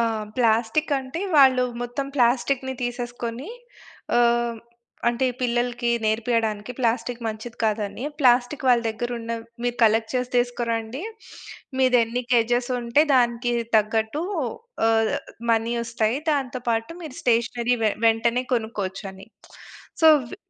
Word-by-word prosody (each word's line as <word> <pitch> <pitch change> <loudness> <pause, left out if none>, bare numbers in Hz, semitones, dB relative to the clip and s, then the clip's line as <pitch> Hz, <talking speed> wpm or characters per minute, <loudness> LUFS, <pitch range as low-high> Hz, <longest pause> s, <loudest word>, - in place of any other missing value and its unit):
ఆ! - - +4 0.3
ప్లాస్టికంటే, 260 +5 +1 0.2
వాళ్ళు 260 -3 +6 0.2
మొత్తం 245 +3 -3
ప్లాస్టిక్కుని 260 +1 +1
తీసేసుకొని 245 - -5 0.7
ఆహ్, 240 - +5 0.3
హ్మ్. 230 - -8 0.5
అంటే 245 +2 +1
పిల్లలకి 240 0 0 0.2
నేర్పియడానికి 220 0 0
ప్లాస్టిక్కు 235 0 -1
మంచిది 220 +2 -6
కాదని, 215 +2 -1 0.2
ప్లాస్టిక్కు 250 +2 +3
వాళ్ళ 240 -2 +5
దగ్గరున్న 230 +1 -4 0.3
మీరు 245 0 -1
కలెక్ట్ 220 0 +3
చేసి 250 0 -1
తీసుకోరండి, 240 +1 -1 0.8
మీదెన్ని 250 -1 +2
కేజేసుంటే, 240 +2 +2
దానికి 240 -1 +2 0.2
తగ్గట్టు 220 +7 0 0.6
ఆహ్, 225 -1 +2 0.4
మనీ 230 +1 +1
ఒస్తాయి, 230 +2 0
దాంతో 265 -3 -1
పాటు 225 +5 0
మీరు 300 -6 -8
స్టేషనరీ 240 +1 +1
వె 215 - +4 0.2
వెంటనే 235 +2 +2
కొనుక్కోచని. 195 -4 -4 0.8
సో, 320 - +9 0.2
వి 385 - -9
240 Hz, 110 wpm, -24 LUFS, 225-250 Hz, 0.8 s, సో